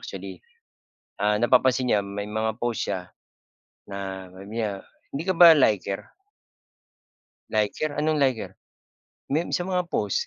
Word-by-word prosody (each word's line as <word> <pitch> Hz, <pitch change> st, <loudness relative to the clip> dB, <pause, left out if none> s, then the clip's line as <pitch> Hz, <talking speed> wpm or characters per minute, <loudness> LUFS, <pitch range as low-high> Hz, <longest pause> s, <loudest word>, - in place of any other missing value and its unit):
actually, -, -, -8 dB, 0.8 s
ah, 105 Hz, 0 st, +2 dB
napapansin 125 Hz, +2 st, +3 dB
niya 105 Hz, -, +4 dB
may 100 Hz, +1 st, -5 dB
mga 110 Hz, 0 st, -1 dB
post 120 Hz, -1 st, -1 dB
siya 90 Hz, -3 st, -4 dB, 0.7 s
na 95 Hz, -1 st, -6 dB
mamaya, 100 Hz, +1 st, -4 dB, 0.3 s
"Hindi 140 Hz, -, -3 dB
ka -, -, +3 dB
ba 170 Hz, -2 st, +10 dB
liker?" 105 Hz, -, +1 dB, 1.4 s
"Liker? 110 Hz, +8 st, 0 dB
anong 155 Hz, -1 st, +2 dB
liker?" 130 Hz, -4 st, -1 dB, 0.8 s
"May 155 Hz, +5 st, +1 dB
sa 175 Hz, -, +1 dB
mga 180 Hz, -1 st, -1 dB
post, 475 Hz, -, -1 dB
110 Hz, 125 wpm, -25 LUFS, 100-150 Hz, 1.4 s, ba